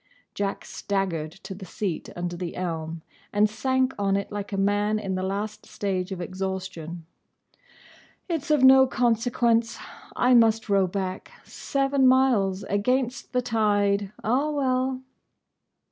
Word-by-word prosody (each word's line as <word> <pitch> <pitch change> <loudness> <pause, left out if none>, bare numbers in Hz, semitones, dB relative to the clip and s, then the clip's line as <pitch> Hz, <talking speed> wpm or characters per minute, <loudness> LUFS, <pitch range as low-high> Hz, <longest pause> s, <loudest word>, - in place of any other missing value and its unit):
Jack 200 -1 -3
staggered 185 -6 -2
to 190 +3 -9
the 190 +1 -10
seat 185 -1 -4
under 175 0 -3
the 175 -1 -5
elm, 165 -2 -4 0.3
and 205 +1 +4
sank 260 +4 0
on 195 -1 +2
it 200 - -4
like 205 0 -5
a 200 - -2
man 205 +2 +1
in 200 -3 -3
the 185 - -2
last 200 +3 -4
stage 190 -2 -3
of 190 - -4
exhaustion. 185 -2 -5 1.2
"It's 330 -3 -3
of 300 -3 +3
no 265 0 +8
consequence. 235 -1 +1 0.4
I 250 +1 +3
must 225 -2 +4
row 195 -2 +3
back. 185 0 -4
Seven 275 -1 +1
miles. 235 -8 +3
Against 250 +5 -1
the 250 -1 0
tide. 205 -4 +1
Ah, 260 +7 +1
well!" 260 -2 0
205 Hz, 135 wpm, -25 LUFS, 190-250 Hz, 1.2 s, no